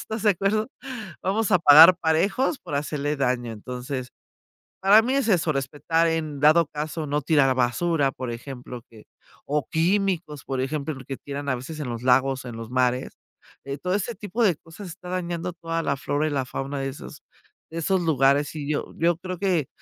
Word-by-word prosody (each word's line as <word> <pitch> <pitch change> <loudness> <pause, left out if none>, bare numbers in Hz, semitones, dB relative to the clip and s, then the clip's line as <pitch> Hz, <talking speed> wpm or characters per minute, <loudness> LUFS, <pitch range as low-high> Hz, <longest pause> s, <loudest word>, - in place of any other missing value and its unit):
¿estás 220 -1 -5
de 210 - +6
acuerdo? 200 +4 0 0.5
Vamos 215 +3 0
a 180 - +6
pagar 160 +3 +9
parejos 195 - +1
por - - -7
hacerle 145 0 -2
daño. 125 -3 -1
Entonces, 125 +3 -6 0.7
para 200 +3 +7
mí 255 - 0
es 275 -4 +1
eso, 175 -5 +2
respetar 145 +5 0
en 155 -3 -2
dado 155 +2 +5
caso, 155 +1 -4
no 145 +1 0
tirar 135 -2 +3
basura, 140 +3 +1
por 130 -2 -5
ejemplo, 125 0 -8
que, 110 -2 -16 0.4
o 145 -1 -1
químicos, 175 -4 0
por 135 -1 -3
ejemplo, 150 +3 -2
porque 135 0 -7
tiran 140 0 -6
a 130 - +1
veces 140 +6 -8
en 140 -4 -4
los 115 -1 -5
lagos, 130 +1 +3
en 120 -2 -7
los 115 -1 -7
mares, 125 0 0 0.5
eh, 140 0 -4
todo 180 +3 -2
ese 210 +4 -2
tipo 215 +3 -2
de 190 -6 +4
cosas 165 +6 -11
está 180 +1 -10
dañando 175 -1 -3
toda 165 -1 -3
la 140 - 0
flora 145 +3 -1
y - - -2
la 135 -3 -1
fauna 135 +2 -4
de 135 0 -2
esos 135 - -10 0.5
de 165 - -4
esos 190 +4 +1
lugares 145 -2 +2
y 145 -2 -5
yo 145 - -3
yo 170 +1 +2
creo 185 +1 -6
que 180 -8 +1
150 Hz, 190 wpm, -24 LUFS, 135-175 Hz, 0.7 s, pagar